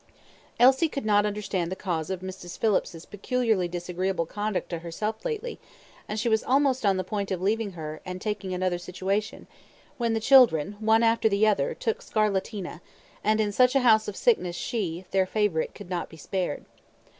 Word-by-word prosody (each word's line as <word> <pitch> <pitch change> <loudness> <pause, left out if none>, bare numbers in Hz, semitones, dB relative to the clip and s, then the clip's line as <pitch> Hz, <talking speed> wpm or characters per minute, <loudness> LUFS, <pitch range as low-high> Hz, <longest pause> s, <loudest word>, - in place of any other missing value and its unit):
Elsie 265 +6 +5
could 275 -5 -5
not 205 -1 +3
understand 200 -4 -2
the - - -2
cause 170 -5 -3
of 190 -1 -3
Mrs. 185 -2 -8
Phillips's 190 -6 0
peculiarly 220 -3 0
disagreeable 180 +1 -2
conduct 205 +3 -3
to 170 - -2
herself 210 +6 -4
lately, 475 0 -4 0.5
and 215 - -3
she 235 - -1
was 220 -1 +2
almost 265 -1 +2
on 195 -1 +3
the 185 - -1
point 200 +1 -3
of 190 - -2
leaving 205 +2 0
her, 155 -2 -7
and 180 0 -6
taking 205 -2 -3
another 180 -1 -1
situation, 190 +4 -3 0.5
when 230 -1 +1
the - - +1
children, 215 - +5
one 220 +1 +3
after 225 0 +3
the 200 +1 +3
other, 200 -10 +1
took 225 - -2
scarlatina, 200 -4 -2 0.4
and 215 +1 +2
in 210 -1 +1
such 250 +5 +3
a 270 - +4
house 220 -3 +4
of 210 - -4
sickness 185 - +1
she 185 -5 -3
their 190 -1 +2
favourite 205 -6 0
could 180 - -11
not 175 -1 -2
be 160 - -13
spared. 180 0 -3
205 Hz, 180 wpm, -26 LUFS, 180-220 Hz, 0.5 s, Elsie